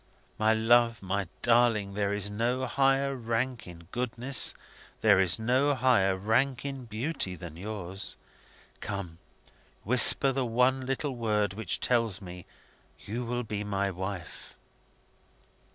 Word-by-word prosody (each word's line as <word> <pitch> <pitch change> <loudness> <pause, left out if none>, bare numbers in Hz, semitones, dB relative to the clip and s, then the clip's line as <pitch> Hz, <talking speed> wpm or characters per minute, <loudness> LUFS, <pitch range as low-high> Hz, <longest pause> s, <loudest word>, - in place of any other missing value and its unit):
My 110 0 +3
love, 115 0 +3
my 95 0 -2 0.2
darling, 115 -4 +3
there 100 0 -1
is 100 0 -1
no 120 +5 -1
higher 135 +1 +1
rank 120 0 -3
in 85 -1 -12
goodness, 125 +2 +1 0.5
there 105 -4 +5
is 95 0 +3
no 130 +6 +1
higher 115 -7 +2
rank 120 +7 0
in 135 -2 -5
beauty, 110 - -3
than 85 -2 -10
yours! 95 0 -5 0.6
Come! 90 -5 -6 0.6
whisper 130 +4 +6
the 135 0 -1
one 125 +2 +1
little 135 +1 -2
word 105 -4 0
which 110 +2 -3
tells 115 -5 +1
me 90 -2 -10 0.5
you 115 +4 -5
will 120 +1 -3
be 105 -2 -4
my 100 -1 -2
wife!" 95 -1 -7
110 Hz, 130 wpm, -28 LUFS, 100-125 Hz, 0.6 s, whisper